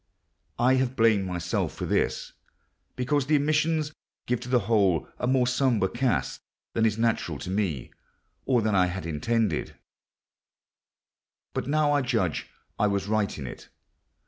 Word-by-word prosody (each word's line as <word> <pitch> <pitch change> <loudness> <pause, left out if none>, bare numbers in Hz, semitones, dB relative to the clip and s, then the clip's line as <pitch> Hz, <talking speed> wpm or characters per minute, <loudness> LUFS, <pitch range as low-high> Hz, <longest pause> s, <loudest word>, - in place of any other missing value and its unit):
I 130 +2 +4
have 130 0 0
blamed 110 -5 +3
myself 90 -1 -2
for - - -4
this, - - -1 0.6
because 135 +2 0
the 155 - +4
omissions 155 +1 +1 0.3
give 125 -1 0
to 125 - -8
the 125 -1 +3
whole 100 -6 +2
a 125 - -1
more 130 -1 +3
sombre 125 -5 +2
cast 120 - -1 0.3
than 115 0 +3
is 110 0 -1
natural 115 -9 0
to 90 - -6
me, 95 - -2 0.6
or 125 -4 +3
than 110 -1 +1
I 90 -2 +4
had 90 0 -5
intended; 90 +4 -1 1.8
but - - -3
now 150 0 +2
I 145 -1 +3
judge 115 - -1 0.3
I 105 - +4
was 100 -1 -1
right 105 -2 0
in 70 - -6
it. - - -9
115 Hz, 150 wpm, -27 LUFS, 95-130 Hz, 1.8 s, I